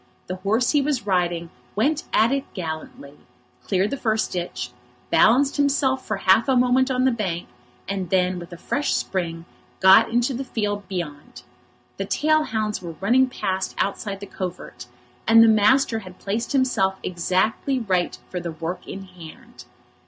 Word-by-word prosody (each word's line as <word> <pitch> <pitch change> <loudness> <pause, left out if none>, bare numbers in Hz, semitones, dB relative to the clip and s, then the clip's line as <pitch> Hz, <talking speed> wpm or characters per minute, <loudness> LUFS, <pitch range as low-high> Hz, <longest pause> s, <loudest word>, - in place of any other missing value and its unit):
The 185 - -5
horse 215 +6 +1
he 295 - +3
was 275 -5 -1
riding 175 -3 0 0.2
went 285 +9 +1
at 225 +3 +3
it 275 0 -2
gallantly, 160 -5 -6 0.5
cleared 195 +2 0
the 280 - -2
first 220 -3 0
ditch, 175 -8 -4 0.4
balanced 270 +6 +4
himself 275 -2 +1
for 215 - -1
half 195 +7 +3
a 265 - +4
moment 250 +1 +3
on 255 -1 +1
the 260 - +4
bank, 190 -7 -3 0.4
and 190 -3 -3
then, 185 0 +1
with 175 0 -10
a 175 - -8
fresh 290 +10 -1
spring, 170 -3 -3 0.3
got 190 +4 +7
into 240 +3 +1
the 260 +2 -3
field 205 -5 -3
beyond. 170 -6 -6 0.5
The - - -2
tail 310 0 +2
hounds 215 -4 -2
were 170 -3 -7
running 250 +7 +3
past 190 -6 -3
outside 200 0 -2
the - - -5
covert, 180 -9 -7 0.4
and 225 0 +8
the - - +6
master 225 +2 +4
had 185 -3 -12
placed 215 +4 -3
himself 250 -8 +2
exactly 185 +9 0
right 185 -7 0
for 180 - -3
the 170 -1 -5
work 165 +3 -5
in 195 - -7
hand. 190 +7 -13
205 Hz, 165 wpm, -23 LUFS, 180-250 Hz, 0.5 s, and